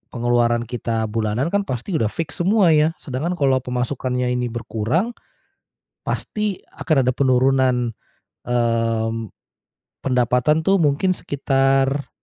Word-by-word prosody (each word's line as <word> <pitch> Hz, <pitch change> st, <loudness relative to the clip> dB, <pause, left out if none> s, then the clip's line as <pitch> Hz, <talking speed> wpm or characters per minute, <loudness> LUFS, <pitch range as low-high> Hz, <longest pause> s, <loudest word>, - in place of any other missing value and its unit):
pengeluaran 120 Hz, 0 st, +2 dB
kita 115 Hz, -1 st, -2 dB
bulanan 115 Hz, +7 st, -1 dB
kan 200 Hz, -1 st, 0 dB
pasti 125 Hz, -, -4 dB
udah 110 Hz, -, +1 dB
fix 155 Hz, +8 st, -5 dB
semua 190 Hz, 0 st, +4 dB
ya 155 Hz, +1 st, +3 dB
sedangkan 145 Hz, +6 st, -3 dB
kalau 135 Hz, -5 st, +2 dB
pemasukannya 125 Hz, 0 st, -2 dB
ini 125 Hz, 0 st, -1 dB
berkurang. 120 Hz, -, -2 dB, 1.0 s
Pasti 210 Hz, -3 st, -3 dB
akan 145 Hz, -5 st, +1 dB
ada 125 Hz, -, +2 dB
penurunan, 130 Hz, -2 st, +2 dB, 0.6 s
mmm, 115 Hz, -2 st, 0 dB, 0.7 s
pendapatan 125 Hz, +4 st, +2 dB
tuh 195 Hz, +3 st, +4 dB
mungkin 165 Hz, +5 st, +2 dB
sekitar, 135 Hz, 0 st, +1 dB
130 Hz, 115 wpm, -21 LUFS, 120-150 Hz, 1.0 s, semua